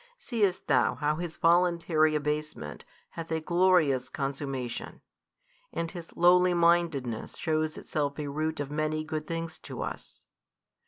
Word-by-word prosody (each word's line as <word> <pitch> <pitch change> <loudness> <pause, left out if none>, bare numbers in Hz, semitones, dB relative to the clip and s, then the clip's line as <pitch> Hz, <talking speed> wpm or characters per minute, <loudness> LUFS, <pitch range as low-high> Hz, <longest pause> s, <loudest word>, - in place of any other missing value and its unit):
Seest 205 - 0
thou 135 - +3
how 150 +3 0
His 170 -1 -5
voluntary 170 -2 +3
abasement 150 - -3 0.3
hath 165 0 -7
a 160 - +1
glorious 160 -7 +3
consummation, 135 -3 -4 0.7
and 165 -1 -3
His 170 -3 -10
lowly 180 +1 +5
mindedness 170 -9 +1
shews 155 -1 -1
itself 145 -2 -2
a 150 -2 -3
root 155 +2 -2
of 145 -1 -3
many 155 +1 -1
good 155 -1 -4
things 165 -1 -4
to - - -6
us? - - -8
155 Hz, 130 wpm, -29 LUFS, 145-170 Hz, 0.7 s, lowly